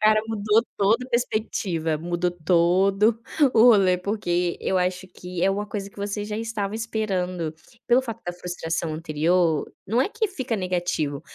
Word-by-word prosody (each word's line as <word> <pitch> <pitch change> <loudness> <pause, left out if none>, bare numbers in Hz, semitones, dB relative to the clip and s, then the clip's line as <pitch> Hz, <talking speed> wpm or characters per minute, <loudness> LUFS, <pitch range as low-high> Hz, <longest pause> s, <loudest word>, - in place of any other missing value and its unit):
Cara, 215 0 +5
mudou 215 +1 +2
toda 225 +6 +2
perspectiva, 195 -9 -1
mudou 175 +1 -1
todo 185 +6 +2 0.3
o 220 - +6
rolê, 195 -7 +6
porque 180 -3 -1
eu 190 - +1
acho 180 +1 -1
que, 180 -1 -6
é 195 - +4
uma 205 +2 -2
coisa 200 -1 -5
que - - -26
vocês 205 +1 -4
já 210 - -3
estavam 220 -2 -3
esperando, 185 -7 -2 0.3
pelo 245 +2 +5
fato 230 -4 -7
da 175 - -3
frustração 170 -2 -3
anterior, 160 +1 +1 0.2
não 230 +5 +1
é 265 - +2
que 440 0 -1
fica 260 - -3
negativo, 175 -6 -1
190 Hz, 160 wpm, -24 LUFS, 175-215 Hz, 0.3 s, o